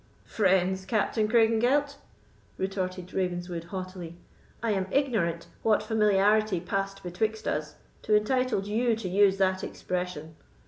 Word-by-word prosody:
"Friends, 190 -2 +1
Captain 215 +1 +1
Craigengelt!" 240 +6 +3 0.6
retorted 185 -1 -3
Ravenswood, 175 -2 -2
haughtily; 185 -2 -7 0.5
"I 230 - +1
am 190 -2 0
ignorant 200 - 0 0.2
what 215 -1 +2
familiarity 210 -2 +3
passed 195 +2 -3
betwixt 215 +5 -2
us 150 0 -2 0.3
to 215 - +2
entitle 255 0 +1
you 225 +3 +1
to 220 -3 -5
use 195 +1 +4
that 190 -1 +1
expression. 180 -4 -4
195 Hz, 120 wpm, -28 LUFS, 180-220 Hz, 0.6 s, use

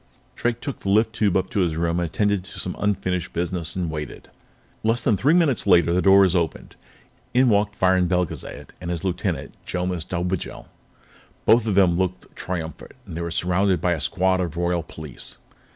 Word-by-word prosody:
Drake 120 -1 -1
took 140 -3 -5
the 100 - -4
lift 110 +2 +3
tube 105 -5 +2
up 95 - -2
to 110 - 0
his 85 -4 +1
room, 85 +1 0
attended 100 +3 0
to - - -9
some 90 - -3
unfinished 95 -4 -1
business, 85 -1 -2
and 90 -3 -2
waited. 75 -4 -7 0.5
Less 115 +2 +1
than 115 - +3
three 145 - +3
minutes 150 -12 +2
later, 85 -3 +5
the 90 - +2
door 100 +1 +7
was 95 -2 +4
opened. 85 -3 -2 0.6
In 130 0 +5
walked 105 -1 +1
Viron 95 -1 +3
Belgezad 90 -2 -3
and 85 - -5
his 85 -2 -3
lieutenant, 95 -2 -2
Jomis 90 -2 -2
Dobigel. 90 +1 -3 0.8
Both 115 0 +5
of 105 - +1
them 90 -3 +4
looked 90 0 -3
triumphant, 80 -3 -5
and 90 -6 -8
they 85 - -3
were 85 - -3
surrounded 90 +2 +1
by 90 - +1
a 80 -4 -1
squad 95 0 +1
of 85 -2 -4
Royal 85 0 0
Police. 80 -4 -8
90 Hz, 185 wpm, -23 LUFS, 85-100 Hz, 0.8 s, door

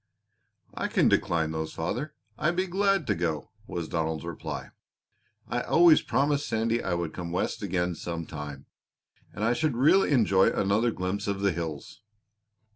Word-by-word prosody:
"I - - -2
can - - +3
decline 80 -2 +1
those, 80 0 -4
father. 130 - -3 0.2
I'd 155 +7 0
be 185 +1 +1
glad 195 -1 +1
to - - +1
go!" 80 -3 -2 0.2
was 85 -2 -4
Donald's 80 0 -2
reply. 85 -2 -6 0.8
"I 120 - -1
always 170 +3 +6
promised 145 +1 +1
Sandy 115 +1 0
I 90 - -1
would 85 -2 -3
come 85 -2 -5
West 90 - -2
again 90 -3 -1
some 85 -1 -5
time, 75 -3 -7 0.7
and 105 - -5
I 115 +2 +3
should 150 0 0
really 170 +10 +5
enjoy 105 -9 +4
another 100 +5 +1
glimpse 100 0 -3
of 100 -1 -2
the 100 -1 +3
hills." 80 -2 -6
100 Hz, 160 wpm, -27 LUFS, 85-135 Hz, 0.8 s, always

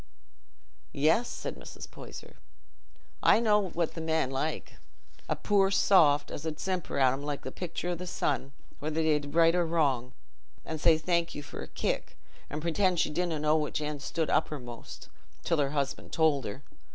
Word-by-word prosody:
"Yes," 160 +12 +3
said - - -5
Mrs. - - -9
Poyser, - - -11 0.8
"I - - +6
know 210 -4 +3
what 170 -2 -1
the 165 - -5
men 160 -4 0
like—a 135 +4 -5
poor 200 -2 +3
soft, 155 -7 +4
as 145 - -6
'ud 160 -1 -4
simper 185 -3 -2
at 130 -2 +4
'em 135 - -4
like 145 -1 -4
the 130 - -5
picture 175 +1 -4
o' - - +1
the 180 +1 -6
sun, 140 -5 -1 0.3
whether 155 +1 -3
they 155 -1 +3
did 145 +1 -8
right 165 0 +6
or 175 0 +3
wrong, 140 -7 +1 0.5
an' 160 -1 -4
say 160 +1 +5
thank 170 +1 0
you 145 - -5
for - - -8
a - - -6
kick, - - -3 0.3
an' 150 +2 -4
pretend 175 +2 +1
she - - +2
didna 170 0 -1
know 150 +1 +2
which 150 -1 0
end 150 -1 -4
she - - -6
stood 165 -2 -1
uppermost, 125 -7 -3 0.4
till 165 - +1
her 140 -1 +2
husband 140 -1 -3
told 155 -4 +2
her. 115 +8 -6
155 Hz, 180 wpm, -29 LUFS, 145-170 Hz, 0.8 s, I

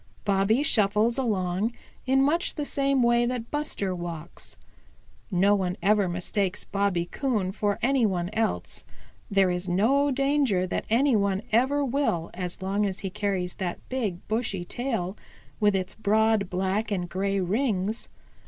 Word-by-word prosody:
Bobby 200 +6 +2
shuffles 220 0 +2
along 205 -2 0 0.3
in 270 +1 +4
much 330 +5 +1
the 295 - -2
same 275 -2 +1
way 240 0 +3
that 245 -2 -4
Buster 295 -10 -2
walks. 170 -2 -8 0.7
No 195 +1 +3
one 185 -2 0
ever 205 -1 +3
mistakes 180 +2 -1
Bobby 195 -4 0
Coon 210 -2 -1
for 205 0 -1
any 265 0 +3
one 180 -2 -2
else. 220 0 -2 0.5
There 195 -3 +3
is 180 +1 -2
no 255 +11 +3
danger 275 -8 +2
that 185 - -3
any 255 +3 +3
one 200 -1 +1
ever 265 +6 +3
will 245 - -1
as 180 +1 -5
long 200 +2 0
as 190 -1 -5
he 195 - -4
carries 185 -2 -2
that 180 -3 -3
big, 215 -9 -3
bushy 215 -5 -1
tail 225 -5 -3 0.4
with 205 -2 +3
its 185 -1 -2
broad 220 -2 +2
black 190 +4 -1
and 180 -4 -2
gray 195 +2 -1
rings. 210 +1 -1
205 Hz, 150 wpm, -26 LUFS, 185-240 Hz, 0.7 s, in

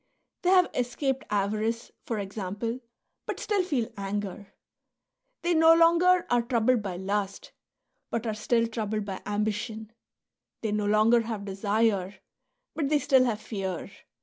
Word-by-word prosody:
They 360 - +1
have 365 -1 +5
escaped 260 +2 -1
avarice, 215 +3 -1 0.2
for 230 - -2
example, 205 +4 -4 0.5
but - - -3
still 415 -3 +1
feel 280 -11 -1
anger; 200 0 -4 0.9
they 345 0 +2
no 325 0 +7
longer 340 +2 +5
are 245 0 +3
troubled 235 0 +2
by 190 -3 -4
lust, 200 +1 -3 0.6
but 230 0 -2
are 220 - -1
still 230 +2 +1
troubled 215 -2 -3
by 195 -2 -5
ambition; 215 +1 -2 0.7
they 220 - -1
no 210 0 0
longer 215 +3 +4
have 220 -3 -5
desire, 200 0 0 0.6
but 290 -4 -1
they 300 - +4
still 265 -3 +4
have 230 -3 -1
fear. 195 -3 -4
220 Hz, 140 wpm, -27 LUFS, 205-255 Hz, 0.9 s, no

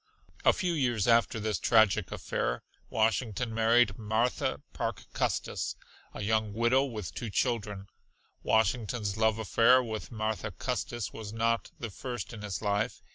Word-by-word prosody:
A - - +7
few 180 -4 -1
years 120 - +1
after 115 -1 +4
this 105 -2 -1
tragic 110 -4 +4
affair - - -2 0.3
Washington 115 +1 0
married 115 -1 +3
Martha 110 +3 0
Parke - - -3
Custis, - - -1 0.4
a - - -4
young 110 0 +1
widow 120 +4 +3
with 110 -8 -5
two 120 - -4
children. 105 -4 -1 0.6
Washington's 110 -1 +1
love 110 0 +2
affair 115 +4 +4
with 110 -2 -5
Martha 110 -1 -2
Custis 120 +2 -3
was 110 -2 -7
not 115 +1 0
the 115 -2 -5
first 120 +3 -5
in 110 - -8
his 100 -2 -4
life. 105 +3 -1
110 Hz, 140 wpm, -30 LUFS, 105-120 Hz, 0.6 s, A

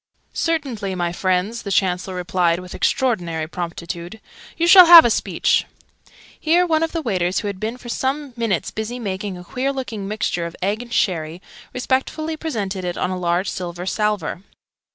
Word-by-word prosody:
"Certainly, 260 - -2
my 175 -1 -1
friends!" 185 +5 -1
the 200 - -6
Chancellor 185 0 0
replied 175 -1 +1
with 180 0 -9
extraordinary 175 -11 0
promptitude. 170 +3 -6 0.4
"You 335 - +2
shall 360 0 +9
have 335 -1 +11
a 235 - +3
speech!" - - +1 0.7
Here 340 +3 +3
one 320 -2 +1
of 325 - 0
the 330 -2 -3
waiters, 185 -6 0
who 210 - -4
had 200 -2 -5
been 220 +4 -3
for 250 - -12
some 270 +3 -2
minutes 225 -7 -1
busy 220 +3 -4
making 195 -4 -4
a 180 - -10
queer 255 +9 -2
looking 230 -7 -5
mixture 185 -5 -2
of 170 - -10
egg 205 +5 -1
and 240 -1 -11
sherry, 165 -6 0 0.3
respectfully 265 +5 -1
presented 205 - -4
it 175 -1 -3
on 180 - -1
a - - -2
large 175 +1 0
silver 175 -1 -5
salver. 210 -4 -1
200 Hz, 175 wpm, -21 LUFS, 180-250 Hz, 0.7 s, have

